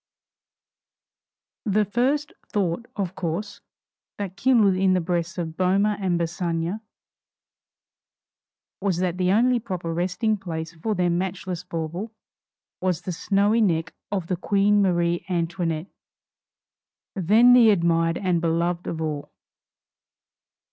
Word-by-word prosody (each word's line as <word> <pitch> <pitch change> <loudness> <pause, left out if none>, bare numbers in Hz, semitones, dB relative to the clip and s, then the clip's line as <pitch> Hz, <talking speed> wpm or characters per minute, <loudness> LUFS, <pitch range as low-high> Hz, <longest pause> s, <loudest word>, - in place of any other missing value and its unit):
The 210 0 +2
first 265 +8 0 0.2
thought, 200 +3 -1
of 190 -3 -2
course, 185 +4 -4 0.6
that 195 -2 -5
kindled 220 -3 +4
in 185 0 +3
the 185 - +3
breasts 170 0 -2
of 160 -2 -4
Boehmer 195 +4 +2
and 180 -3 0
Bassange 170 +3 -2 2.0
was, 195 -3 0
that 180 0 -1
the 180 0 +2
only 245 +4 +3
proper 180 -6 -4
resting 180 +6 0
place 165 -3 -5
for 205 +6 -2
their 175 -1 +1
matchless 180 0 -3
bauble 170 +4 -5 0.7
was 180 -3 0
the 185 - -4
snowy 200 +5 +2
neck 165 -6 +1 0.2
of 190 -4 -1
the 180 +1 -2
Queen 205 +2 +2
Marie 175 -2 +1
Antoinette, 170 -1 -2 1.2
then 215 +7 +5
the 240 -3 +7
admired 165 -3 +2
and 180 -4 0
beloved 170 +1 0
of 160 - -3
all! 150 -2 -4
185 Hz, 120 wpm, -24 LUFS, 170-205 Hz, 2.0 s, the